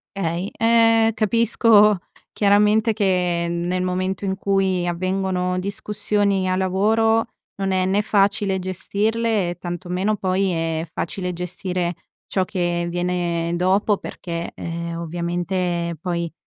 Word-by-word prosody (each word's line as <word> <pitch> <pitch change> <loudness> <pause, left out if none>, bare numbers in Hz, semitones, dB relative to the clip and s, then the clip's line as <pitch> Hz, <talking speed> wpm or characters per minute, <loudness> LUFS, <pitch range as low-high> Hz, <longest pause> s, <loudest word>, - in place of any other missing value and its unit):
Okay, 175 +1 -2
ehm, 225 0 +4
capisco 215 -1 +4 0.4
chiaramente 210 +2 +3
che 180 -4 +1
nel 175 +2 -1
momento 185 +1 -2
in 190 -1 -1
cui 190 -3 +1
avvengono 185 0 -1
discussioni 200 -1 -1
a 185 - +1
lavoro 220 +4 +2 0.3
non 195 -1 -1
è 185 -1 +1
né 195 +2 +2
facile 200 -2 +1
gestirle, 210 +2 -1
e 175 - -4
tanto 175 0 -6
meno 190 +4 0
poi 190 0 0
è 165 0 -2
facile 180 +1 -3
gestire 180 0 -3 0.3
ciò 190 -2 0
che 175 -2 -1
viene 175 -1 -1
dopo, 195 +3 +2
perché, 170 -2 -6
ehm, 170 0 -5
ovviamente 175 0 -2
poi, 170 -2 -2
185 Hz, 120 wpm, -22 LUFS, 175-205 Hz, 0.4 s, ehm